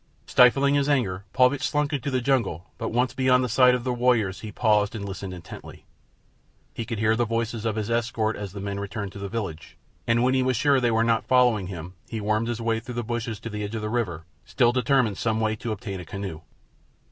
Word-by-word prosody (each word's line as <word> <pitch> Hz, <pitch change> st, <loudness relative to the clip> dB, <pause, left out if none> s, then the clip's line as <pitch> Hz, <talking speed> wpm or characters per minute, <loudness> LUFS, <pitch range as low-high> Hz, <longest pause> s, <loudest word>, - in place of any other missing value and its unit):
Stifling 135 Hz, +3 st, +5 dB
his 145 Hz, 0 st, +2 dB
anger, 100 Hz, -9 st, 0 dB
Paulvitch 130 Hz, +1 st, +3 dB
slunk 150 Hz, +1 st, 0 dB
into 140 Hz, -1 st, -2 dB
the 130 Hz, -2 st, 0 dB
jungle; 115 Hz, -, 0 dB
but 115 Hz, -, -2 dB
once 125 Hz, +2 st, +1 dB
beyond 130 Hz, -1 st, +3 dB
the -, -, 0 dB
sight 125 Hz, 0 st, +5 dB
of 125 Hz, -, -4 dB
the 125 Hz, 0 st, -1 dB
warriors 120 Hz, -6 st, +1 dB
he 110 Hz, -, -7 dB
paused 105 Hz, +1 st, +2 dB
and 100 Hz, -2 st, -5 dB
listened 95 Hz, -1 st, -6 dB
intently. 90 Hz, -2 st, -10 dB, 0.9 s
He 115 Hz, -, -4 dB
could 115 Hz, 0 st, -4 dB
hear 110 Hz, +1 st, +2 dB
the 120 Hz, -, +1 dB
voices 115 Hz, 0 st, -2 dB
of 110 Hz, -2 st, 0 dB
his 110 Hz, +1 st, -3 dB
escort 115 Hz, -1 st, 0 dB
as 100 Hz, -2 st, -6 dB
the 100 Hz, -, -6 dB
men 100 Hz, 0 st, -4 dB
returned 100 Hz, 0 st, -5 dB
to 100 Hz, -, -10 dB
the 100 Hz, 0 st, -5 dB
village, 95 Hz, -9 st, -5 dB, 0.3 s
and 115 Hz, +1 st, +3 dB
when 130 Hz, +1 st, +3 dB
he 130 Hz, -, +3 dB
was 130 Hz, -2 st, +1 dB
sure 140 Hz, +2 st, +3 dB
that -, -, +1 dB
they 120 Hz, -, +2 dB
were 115 Hz, 0 st, +2 dB
not 115 Hz, -1 st, +1 dB
following 125 Hz, -7 st, +3 dB
him 90 Hz, -1 st, -7 dB, 0.2 s
he 115 Hz, -, -4 dB
wormed 110 Hz, +2 st, 0 dB
his 120 Hz, -1 st, -3 dB
way 115 Hz, -1 st, 0 dB
through 120 Hz, +2 st, -8 dB
the 120 Hz, -, -2 dB
bushes 115 Hz, -1 st, -3 dB
to 115 Hz, -, -6 dB
the 105 Hz, 0 st, -4 dB
edge 105 Hz, +2 st, -4 dB
of 110 Hz, -, -4 dB
the 105 Hz, -, -2 dB
river, 100 Hz, -9 st, -2 dB, 0.2 s
still 120 Hz, -, +2 dB
determined 125 Hz, -5 st, +1 dB
some 110 Hz, -1 st, 0 dB
way 110 Hz, -1 st, +1 dB
to 115 Hz, -, -4 dB
obtain 100 Hz, -2 st, -5 dB
a 90 Hz, -, -8 dB
canoe. 95 Hz, -4 st, -6 dB
115 Hz, 240 wpm, -25 LUFS, 105-125 Hz, 0.9 s, Stifling